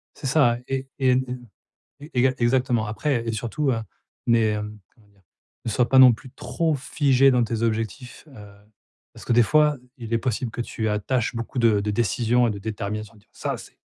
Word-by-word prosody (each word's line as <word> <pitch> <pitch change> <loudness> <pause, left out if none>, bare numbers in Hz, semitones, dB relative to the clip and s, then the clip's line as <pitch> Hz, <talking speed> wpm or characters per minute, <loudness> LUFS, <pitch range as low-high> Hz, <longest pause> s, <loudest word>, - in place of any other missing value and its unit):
C'est 135 - -5
ça, 125 -4 +3
ouais, 135 0 -2
et 130 -1 +3
une 125 -1 -2 0.5
une 145 +2 -11
exa 130 +1 +3
exactement 120 -2 +1
après 120 +3 -1
et 115 - -1
surtout, 120 +6 -1
heu, 115 - -1 0.5
mais, 115 -2 +3
hem, 105 0 -5
comment 110 -3 -26
dire? 100 -1 -29 0.4
Ne - - -1
sois 120 +3 +2
pas 130 +2 +5
non 130 -2 +9
plus 125 +3 -12
trop 160 +3 -1
figée 135 -1 +3
dans 125 -2 +3
tes 115 -1 -3
objectifs, 115 +4 -3
heu, 105 -2 -13 0.6
parce - - -13
que - - +1
des 120 0 +6
fois, 150 +4 +3 0.2
il 115 -2 -6
est - - +4
possible 120 +1 -2
que 120 - -4
tu 110 -2 -3
attaches 115 +4 -1
beaucoup 115 +2 -4
de 115 -3 +4
de 105 +1 -2
décisions 120 +3 +1
et - - 0
de 100 - -6
détermination 105 0 -5
en - - -20
te - - -21
disant: - - -34
«Ça - - -3
c'est - - -14
120 Hz, 210 wpm, -24 LUFS, 110-130 Hz, 0.6 s, non